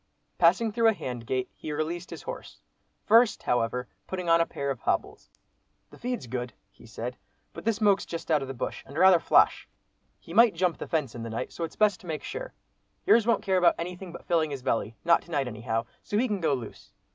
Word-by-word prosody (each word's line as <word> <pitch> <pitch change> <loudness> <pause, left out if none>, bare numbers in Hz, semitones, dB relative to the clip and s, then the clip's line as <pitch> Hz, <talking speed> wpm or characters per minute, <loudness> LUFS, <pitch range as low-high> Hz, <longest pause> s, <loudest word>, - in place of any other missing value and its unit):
Passing 190 +6 +4
through 230 +1 +3
a 225 - +5
hand 125 - -6
gate, 130 -1 -1
he 155 - -7
released 165 +4 -3
his - - -8
horse, - - -8 0.5
first, 230 0 +4
however, 125 +1 0 0.2
putting 180 -2 -4
on 165 0 +5
a 165 - +1
pair 140 0 -3
of 130 - -5
hobbles; - - -2 0.6
"the - - -14
feed's 245 - -3
good," 125 0 -4 0.2
he 100 +3 -17
said, 120 +3 -6 0.4
"but - - -9
this 225 -2 +1
moke's 205 -3 +3
just 165 0 -5
out 150 -2 +4
of 135 - -5
the 135 - -6
bush, - - -4
and 140 - -9
rather 185 0 +7
flash—he - - 0
might 230 -5 +6
jump 175 -1 0
the - - -5
fence 150 -7 -1
in 120 - -7
the 115 - -5
night, 115 - -4
so 170 - -5
it's 165 - -5
best 210 -3 +3
to 180 - -14
make 155 -2 -4
sure. - - -6 0.5
Yours 230 -1 +5
won't 235 - +2
care 190 -2 +2
about 180 -1 +5
anything 180 +1 -6
but 170 - -11
filling 165 -3 +1
his 140 -3 -6
belly, 115 -3 -1
not 170 0 +5
to - - -19
night 140 -5 0
anyhow, 115 0 -3 0.2
so 205 - -2
he 250 +4 +2
can 205 -4 -2
go 155 -4 +2
loose. 120 -4 -9
165 Hz, 225 wpm, -27 LUFS, 125-195 Hz, 0.6 s, rather